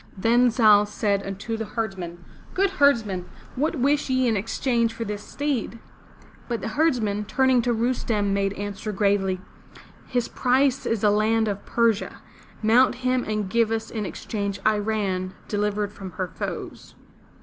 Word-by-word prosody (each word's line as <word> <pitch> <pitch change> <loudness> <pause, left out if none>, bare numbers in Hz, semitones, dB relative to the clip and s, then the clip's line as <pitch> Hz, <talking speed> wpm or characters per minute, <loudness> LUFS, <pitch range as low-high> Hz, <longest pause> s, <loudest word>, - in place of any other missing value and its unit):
Then 240 +5 +4
Zal 215 -3 +5
said 205 -1 0
unto 195 +4 -4
the 225 - -3
herdsmen: 190 -6 -5 0.3
Good 390 0 +2
herdsmen, 220 -10 +3 0.3
what 300 +5 0
wish 280 +2 +1
ye 255 -1 +2
in 225 - +2
exchange 230 +2 0
for 230 - -4
this 210 -1 -4
steed?" 275 -3 -3 0.7
But 235 -2 -2
the - - -3
herdsmen, 220 -8 +1
turning 260 +2 +3
to 240 +1 0
Rustem 225 -3 0
made 195 0 0
answer 205 +1 -5
gravely: 195 -2 +1 0.7
"His 245 -2 0
price 265 +1 +1
is 225 -3 0
the 210 - +4
land 220 +2 +2
of 200 -1 -4
Persia. 230 -3 +1 0.5
Mount 240 +4 +5
him 255 -1 +2
and 210 -2 -2
give 230 +2 +2
us 225 0 -3
in 215 -3 -3
exchange 200 -1 -4
I 215 -1 +3
ran' 195 -3 -2
delivered 205 0 -1
from 190 -4 -9
her 185 +2 -3
foes! - - -6
220 Hz, 155 wpm, -24 LUFS, 205-240 Hz, 0.7 s, Zal